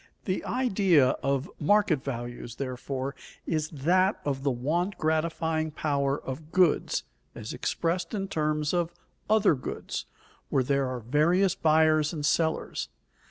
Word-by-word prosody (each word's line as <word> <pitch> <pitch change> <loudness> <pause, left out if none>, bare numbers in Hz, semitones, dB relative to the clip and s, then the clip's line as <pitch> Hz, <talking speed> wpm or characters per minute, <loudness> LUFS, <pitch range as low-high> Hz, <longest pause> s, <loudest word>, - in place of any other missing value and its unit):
_ - - -37
The 185 -2 -1
idea 195 - +3
of 135 +2 0
market 180 -4 +3
values, 120 -2 -5
therefore, 135 +1 -4 0.3
is 155 -2 -1
that 180 +7 +2
of 135 -2 -1
the 140 - +1
want 155 +10 -1
gratifying 160 0 0
power 140 -2 0
of 150 +4 -7
goods 180 -4 +2 0.3
as - - -6
expressed 175 +5 -1
in 195 -1 -2
terms 150 -3 0
of 175 -1 0 0.4
other 215 -4 +5
goods, 130 - -5 0.4
where 135 - +2
there 140 +1 +1
are 130 -1 -4
various 160 - +3
buyers 155 -1 +3
and 150 -3 -3
sellers. 160 +1 0
155 Hz, 135 wpm, -28 LUFS, 140-175 Hz, 0.4 s, other